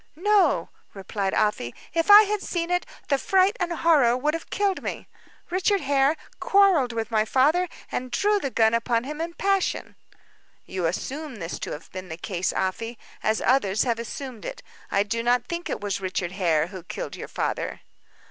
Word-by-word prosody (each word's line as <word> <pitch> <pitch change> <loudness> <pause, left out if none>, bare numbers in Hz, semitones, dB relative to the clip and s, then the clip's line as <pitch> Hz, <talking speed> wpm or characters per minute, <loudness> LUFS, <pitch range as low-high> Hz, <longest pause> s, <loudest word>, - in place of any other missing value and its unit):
"No," 410 +4 +3 0.3
replied 195 0 -2
Afy. 210 - 0 0.2
"If 330 +3 0
I 410 +1 +11
had 420 -1 -1
seen 345 -2 -2
it, 355 0 0 0.2
the 275 -1 +2
fright 385 - +3
and 350 -1 -1
horror 295 -8 +4
would 295 +4 0
have 330 - -5
killed 400 -2 0
me. - - -5 0.4
Richard 380 +2 +2
Hare 275 +1 +3 0.2
quarreled 380 -11 +4
with 225 0 -3
my 215 -1 +3
father, 305 +10 +2 0.2
and 255 0 -3
drew 410 +12 +2
the 275 - -2
gun 225 -3 +3
upon 230 0 +1
him 300 +4 -5
in 335 +1 -4
passion." 390 -1 0 0.7
"You 185 -3 -2
assume 270 - -4
this 170 -5 -5
to - - -5
have 150 - -10
been 185 -1 -7
the 160 - -6
case, 180 0 -2
Afy, 225 +5 -2 0.2
as 220 +1 0
others 215 -6 +3
have 235 -3 0
assumed 235 -1 -6
it. - - -7 0.3
I 200 - +2
do 230 +3 -2
not 245 +1 +2
think 340 +4 -4
that - - -2
it - - -6
was 200 -1 -2
Richard 185 -2 -2
Hare 170 -5 +1
who 190 -2 -8
killed - - -6
your - - -7
father." - - -3
255 Hz, 185 wpm, -25 LUFS, 205-345 Hz, 0.7 s, I